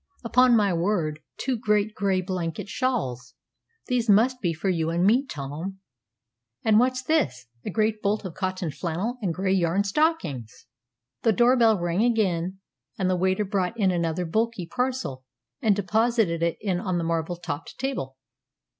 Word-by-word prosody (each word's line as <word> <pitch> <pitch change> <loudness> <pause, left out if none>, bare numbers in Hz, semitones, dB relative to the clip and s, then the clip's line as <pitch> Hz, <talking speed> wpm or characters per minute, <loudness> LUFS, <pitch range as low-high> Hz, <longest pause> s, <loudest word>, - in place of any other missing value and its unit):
"Upon 250 +1 +5
my 205 -4 +3
word, 170 -4 0 0.2
two 265 - -1
great 210 -2 +1
gray 195 -3 +1
blanket 180 -2 -4
shawls! 130 - -2 0.5
These 240 -2 0
must 245 +5 +4
be 175 - +1
for 165 +4 -4
you 165 -3 +1
and 170 +2 +1
me, 250 +7 +3
Tom! 150 - -6 0.9
And 215 -1 +5
what's 255 +1 +1
this? 135 - 0 0.2
A - - -2
great 215 +1 0
bolt 205 +1 0
of 180 - -5
cotton 185 -3 -3
flannel 185 - -3
and 190 -5 0
gray 190 +3 0
yarn 185 +1 +2
stockings!" 195 - -1 0.6
The 225 - +3
door 245 +3 +4
bell 225 -4 +4
rang 175 +4 0
again, 190 -6 +1 0.4
and 185 -3 +1
the - - +2
waiter 190 +3 +1
brought 195 +2 -1
in 195 -3 +3
another 170 0 -1
bulky 220 +2 -1
parcel, 250 - -2 0.4
and 215 -5 +3
deposited 215 -3 +1
it 170 0 0 0.2
on 185 -1 -1
the 170 - -1
marble 165 +1 -1
topped 165 -3 -5
centre - - -12
table. 135 - -5
195 Hz, 165 wpm, -25 LUFS, 170-225 Hz, 0.9 s, Upon